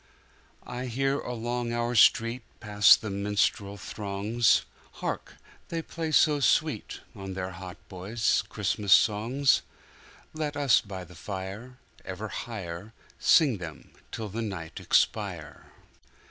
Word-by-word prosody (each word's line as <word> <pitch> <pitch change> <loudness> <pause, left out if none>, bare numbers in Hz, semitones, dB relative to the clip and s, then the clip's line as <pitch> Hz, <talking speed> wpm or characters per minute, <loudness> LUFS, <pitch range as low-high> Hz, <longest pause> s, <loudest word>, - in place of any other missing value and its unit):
I 125 +1 -5
hear 135 +3 0
along 120 0 -3
our 120 +1 -1
street 115 +2 +4 0.2
Pass 105 -2 +6
the 110 - -6
minstrel 100 0 0
throngs; 105 +4 +1 0.3
Hark! - - -5 0.3
they 165 -1 -3
play 160 -1 -4
so 150 0 +4
sweet, 145 -3 +1
On 95 -1 -7
their 95 0 -4
hautboys, 95 +4 -2
Christmas 105 -1 +1
Songs! 120 +5 +3 0.7
Let 150 -2 -3
us 140 -4 +4
by 95 -3 -7
the 90 - -14
fire 100 +7 -7 0.3
Ever 100 +3 -6
higherSing 110 - 0
them 80 -3 -9 0.2
till 110 -2 -5
the 110 +4 -4
night 95 -7 -5
expire! - - 0
110 Hz, 115 wpm, -28 LUFS, 100-125 Hz, 0.7 s, Pass